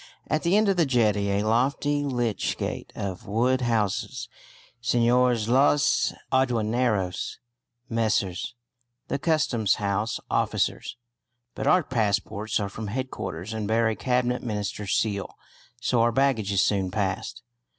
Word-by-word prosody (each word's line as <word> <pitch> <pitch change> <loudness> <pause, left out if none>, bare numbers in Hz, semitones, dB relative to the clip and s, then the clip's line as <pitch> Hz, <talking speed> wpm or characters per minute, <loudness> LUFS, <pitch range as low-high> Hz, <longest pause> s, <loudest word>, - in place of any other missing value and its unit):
At 155 - 0
the 175 +4 +3
end 215 0 +3
of 195 -2 +2
the 170 - +4
jetty 105 -5 +2
a 100 +1 +1
lofty 135 +6 +1
lich 120 -6 -1
gate - - -4
of 95 -2 -5
wood 125 +5 +1
houses 110 -5 -1 0.5
Señores 120 -1 +2
los 140 +4 +3 0.2
Aduaneros, 115 -6 0 0.5
Messrs. 110 -2 -1 0.5
the - - -1
Customs 135 - +2
House 105 +2 -1
Officers. - - -1 0.6
But - - -3
our 180 -1 +5
passports 110 -3 -1
are 100 - -1
from 105 +2 -6
headquarters 110 -5 -4
and 110 -2 -3
bear 115 +1 +2
a 110 - -1
Cabinet 125 0 0
Minister's 105 -3 -2
seal, 100 -3 -1 0.4
so 120 -1 +1
our 120 +1 +3
baggage 115 -5 +1
is 100 -1 +3
soon 95 -3 +1
passed. 95 - -3
115 Hz, 130 wpm, -26 LUFS, 105-125 Hz, 0.6 s, our